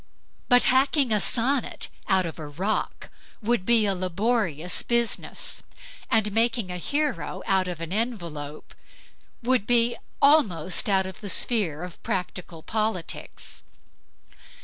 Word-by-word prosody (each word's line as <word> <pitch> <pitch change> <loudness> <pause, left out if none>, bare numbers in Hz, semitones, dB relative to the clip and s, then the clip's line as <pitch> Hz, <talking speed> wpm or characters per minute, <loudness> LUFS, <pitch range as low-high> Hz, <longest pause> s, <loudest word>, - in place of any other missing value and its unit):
But 245 -1 +6
hacking 270 0 +3
a 210 -1 +3
sonnet 245 +7 0 0.2
out 190 -2 +3
of 165 0 -6
a 155 - -6
rock 185 +9 -3 0.3
would 225 -4 0
be 230 -2 +5
a 200 - +1
laborious 185 -2 0
business, 235 -1 0 0.5
and 215 -2 +3
making 225 -3 +1
a 180 - -4
hero 290 - -2
out 190 -1 +2
of 175 -3 -5
an 165 +2 -4
envelope 170 -10 -4 0.7
is 240 -1 +3 0.2
almost 210 - +3
out 190 -1 +3
of 190 -1 -8
the 205 - -4
sphere 180 -9 +1
of 180 -1 -9
practical 180 -3 -4
politics. 215 -6 -3
205 Hz, 125 wpm, -26 LUFS, 180-235 Hz, 0.7 s, But